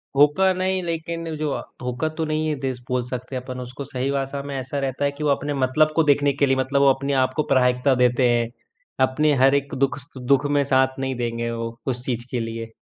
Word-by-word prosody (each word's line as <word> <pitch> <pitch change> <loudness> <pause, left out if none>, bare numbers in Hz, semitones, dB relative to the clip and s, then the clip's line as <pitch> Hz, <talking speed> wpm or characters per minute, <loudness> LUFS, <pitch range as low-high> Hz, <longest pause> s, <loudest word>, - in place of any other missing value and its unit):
धोका 150 +7 +5
नहीं, 185 0 0
लेकिन 165 0 -4
जो 150 -1 -1
अ, - - -3 0.2
धोखा 125 +5 -2
तो 160 - 0
नहीं 155 0 -1
ये 150 - 0
देस 130 -2 -2
बोल 125 -1 0
सकते 125 +1 -5
अपन 130 0 -5
उसको। 125 +3 -7
सही 130 0 -3
भाषा 140 0 -2
में 140 -1 -5
ऐसा 135 +2 -3
रहता 135 +1 -1
है 140 - +1
कि 150 +2 -7
वो 150 - +2
अपने 145 +1 0
मतलब 155 +4 +3
को 165 - +4
देखने 145 -1 +3
के 140 +1 +2
लिए 135 0 +2
मतलब 135 +1 +1
वो 140 - +6
अपने 140 +1 -3
आप 130 - -6
को 155 - +1
प्राथमिकता 125 +1 +3
देते 125 0 +3
हैं। 120 -1 +1 0.6
अपने 150 +2 +2
हर 135 +1 +6
एक 140 0 -1
दुःख 135 +1 +1
सु 130 0 -12
दुःख 135 +3 +2
में 140 - +4
साथ 130 0 +3
नहीं 135 -1 -2
देंगे 115 -1 -2
वो, 115 0 -5
उस 125 -1 -2
चीज़ 120 -2 -2
के 125 - -1
लिए। 115 0 -5
135 Hz, 240 wpm, -23 LUFS, 125-145 Hz, 0.6 s, वो